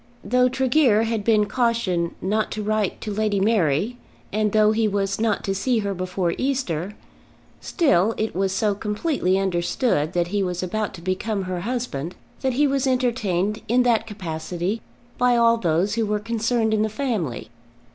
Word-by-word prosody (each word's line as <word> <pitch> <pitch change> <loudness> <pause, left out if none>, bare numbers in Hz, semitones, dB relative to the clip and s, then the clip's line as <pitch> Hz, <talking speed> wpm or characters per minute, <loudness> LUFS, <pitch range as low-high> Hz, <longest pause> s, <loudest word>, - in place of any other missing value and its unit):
Though 250 +1 +3
Tregear 255 -3 +3
had 225 -2 -1
been 215 -1 +3
cautioned 220 -8 0
not 210 +3 0
to 215 - -4
write 215 -2 0
to 210 - -4
Lady 210 -1 0
Mary, 200 - +1 0.4
and 215 0 +1
though 215 0 +4
he 220 0 +2
was 200 0 -1
not 225 -2 +1
to 195 - -1
see 235 +5 0
her 200 - -1
before 185 -1 -2
Easter, 210 - -1 0.6
still 225 - +2
it 215 -3 -2
was 190 +1 +1
so 205 +2 +1
completely 210 - 0
understood 180 - 0
that 175 -1 0
he 205 +1 0
was 180 -1 -2
about 210 +2 -2
to 170 - -11
become 190 +3 -2
her 185 -1 -3
husband, 185 - -3 0.2
that 265 -1 0
he 290 +4 +3
was 275 -1 +1
entertained 220 -6 0
in 245 +3 +3
that 230 -2 +2
capacity 180 +1 -4 0.4
by 245 -1 +4
all 230 0 +4
those 180 +1 +1
who 225 -1 0
were 210 0 +1
concerned 225 +1 0
in 215 - +2
the 215 - +1
family. 215 - -3
210 Hz, 170 wpm, -23 LUFS, 185-230 Hz, 0.6 s, though